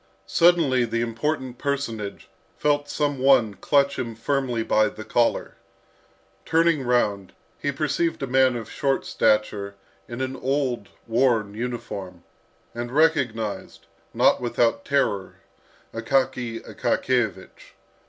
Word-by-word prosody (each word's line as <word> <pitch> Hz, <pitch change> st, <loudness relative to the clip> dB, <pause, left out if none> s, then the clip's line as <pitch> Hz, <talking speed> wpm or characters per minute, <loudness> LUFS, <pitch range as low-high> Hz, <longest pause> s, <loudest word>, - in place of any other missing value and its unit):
Suddenly 165 Hz, -7 st, +4 dB
the 115 Hz, 0 st, -2 dB
important 125 Hz, +2 st, -2 dB
personage 120 Hz, -8 st, -3 dB, 0.3 s
felt 145 Hz, -1 st, +1 dB
some 145 Hz, -3 st, -1 dB
one 130 Hz, -5 st, +4 dB
clutch 140 Hz, +5 st, +1 dB
him 115 Hz, -2 st, -4 dB
firmly 125 Hz, -1 st, -1 dB
by 110 Hz, -1 st, +3 dB
the 110 Hz, -, -9 dB
collar. 120 Hz, -1 st, 0 dB, 0.9 s
Turning 165 Hz, -2 st, +2 dB
round, 105 Hz, -6 st, 0 dB, 0.3 s
he 145 Hz, -, -1 dB
perceived 155 Hz, +2 st, -1 dB
a -, -, +1 dB
man 130 Hz, -1 st, +3 dB
of 115 Hz, -2 st, -5 dB
short 135 Hz, -1 st, -1 dB
stature, 105 Hz, -2 st, +1 dB, 0.3 s
in 120 Hz, +1 st, -7 dB
an 130 Hz, 0 st, -2 dB
old, 130 Hz, -5 st, -1 dB, 0.2 s
worn 115 Hz, -3 st, +1 dB
uniform, 105 Hz, -6 st, -6 dB, 0.5 s
and 120 Hz, +1 st, -5 dB
recognised, 125 Hz, -8 st, 0 dB, 0.3 s
not -, -, +3 dB
without 120 Hz, -1 st, +1 dB
terror, 105 Hz, -9 st, 0 dB, 0.6 s
Akaky 125 Hz, -1 st, -1 dB
Akakiyevich. 120 Hz, -6 st, -2 dB
125 Hz, 115 wpm, -24 LUFS, 115-140 Hz, 0.9 s, Suddenly